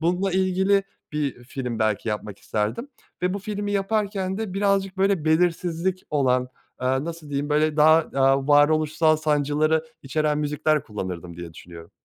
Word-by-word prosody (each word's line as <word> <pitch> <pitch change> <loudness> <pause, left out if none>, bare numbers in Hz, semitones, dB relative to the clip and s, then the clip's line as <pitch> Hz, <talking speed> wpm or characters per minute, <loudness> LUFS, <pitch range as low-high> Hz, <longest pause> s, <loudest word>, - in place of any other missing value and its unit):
bununla 180 +3 0
ilgili 190 +1 +2 0.3
bir 140 -5 -3
film 125 -3 -5
belki 110 0 0
yapmak 105 -1 -4
isterdim 110 - -3 0.3
ve 180 +1 +1
bu - - -2
filmi 205 0 -4
yaparken 195 -1 -1
de 215 -4 -4
birazcık 195 -1 +1
böyle 195 -4 +1
belirsizlik 175 +2 +1
olan, 130 -3 +1 0.3
aaa, 130 +2 0
nasıl 165 -2 -7
diyeyim, 145 +1 -2
böyle 155 +1 +2
daha, 155 +1 +7 0.2
aaa, 135 +1 +3
varoluşsal 155 +2 +4
sancıları 155 +1 +1 0.2
içeren 150 +2 0
müzikler 150 0 0
kullanırdım 90 -5 -6
diye 85 -1 -8
düşünüyorum. 85 -1 -12
155 Hz, 145 wpm, -24 LUFS, 135-185 Hz, 0.3 s, daha